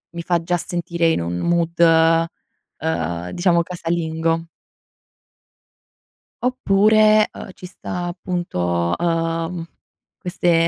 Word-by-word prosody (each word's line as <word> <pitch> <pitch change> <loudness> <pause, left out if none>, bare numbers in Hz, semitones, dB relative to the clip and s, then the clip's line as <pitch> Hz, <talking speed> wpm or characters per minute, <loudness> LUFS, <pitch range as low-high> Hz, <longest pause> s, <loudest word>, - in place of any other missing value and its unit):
mi 170 - -3
fa 175 -1 +1
già 175 +1 0
sentire 170 -1 -1
in 160 - +1
un 85 +1 -3
mood 170 - +1 1.1
uhm, 85 +2 -2
diciamo 175 -1 +2
"casalingo". 165 -1 -2 2.0
Oppure, 215 -3 +4
uhm, - - -9
ci 180 - -12
sta 180 -1 -5
appunto, 90 - -2
uhm, 165 0 -1 0.5
queste 175 -2 +1
170 Hz, 95 wpm, -21 LUFS, 165-180 Hz, 2.0 s, Oppure